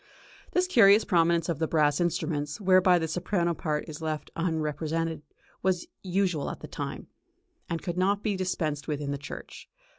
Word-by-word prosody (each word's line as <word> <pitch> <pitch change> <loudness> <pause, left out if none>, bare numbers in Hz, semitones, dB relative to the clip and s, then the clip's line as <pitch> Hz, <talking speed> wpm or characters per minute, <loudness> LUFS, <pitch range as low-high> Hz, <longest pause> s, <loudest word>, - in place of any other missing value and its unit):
This 360 - +3
curious 220 - +6
prominence 170 -2 +3
of 165 -4 -2
the 160 - +1
brass 150 -1 +2
instruments, 150 -3 -1
whereby 185 -2 +5
the 160 -1 -1
soprano 175 +1 0
part 150 -2 -2
is 155 0 -8
left 155 -1 -3
unrepresented, 160 -1 -1 0.4
was 185 -2 +1 0.2
usual 180 -5 0
at - - -6
that - - -9
time, - - -5 0.6
and 165 -1 -3
could 175 0 -3
not 200 +2 +2
be 210 -3 0
dispensed 170 -5 -2
with 150 -2 -2
in 140 -1 -3
the 140 - -3
church. 145 - -9
170 Hz, 170 wpm, -28 LUFS, 155-185 Hz, 0.6 s, curious